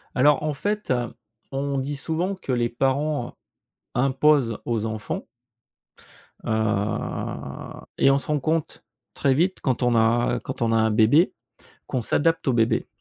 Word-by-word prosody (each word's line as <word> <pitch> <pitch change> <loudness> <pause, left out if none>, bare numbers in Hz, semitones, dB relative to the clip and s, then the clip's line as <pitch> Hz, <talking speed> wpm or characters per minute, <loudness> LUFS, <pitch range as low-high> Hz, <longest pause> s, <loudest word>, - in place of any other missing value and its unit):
Alors 145 +4 +4
en 155 -1 0
fait, 205 +7 -2
heu, 120 -2 -1 0.4
on 140 +1 -2
dit 140 +2 -3
souvent 170 +7 -2
que 185 -8 -5
les 120 -1 +1
parents 135 +2 -1 0.6
imposent 135 -1 +3
aux 115 -2 -1
enfants 110 -1 -4 1.2
heu 110 -2 -2 0.2
et 135 - +5
on 135 - +4
se 140 - -4
rend 150 -1 +1
compte, 155 +2 -2 0.3
très 135 - +2
vite 175 +7 +1
quand 130 -2 0
on 120 -1 +3
a 115 +2 +2
quand - - -6
on 115 -1 +2
a 115 - +3
un 110 0 +3
bébé, 115 - +4 0.5
qu'on 125 - -2
s'adapte 160 +8 +1
au - - +4
bébé 115 -1 +2
130 Hz, 150 wpm, -24 LUFS, 115-150 Hz, 1.2 s, et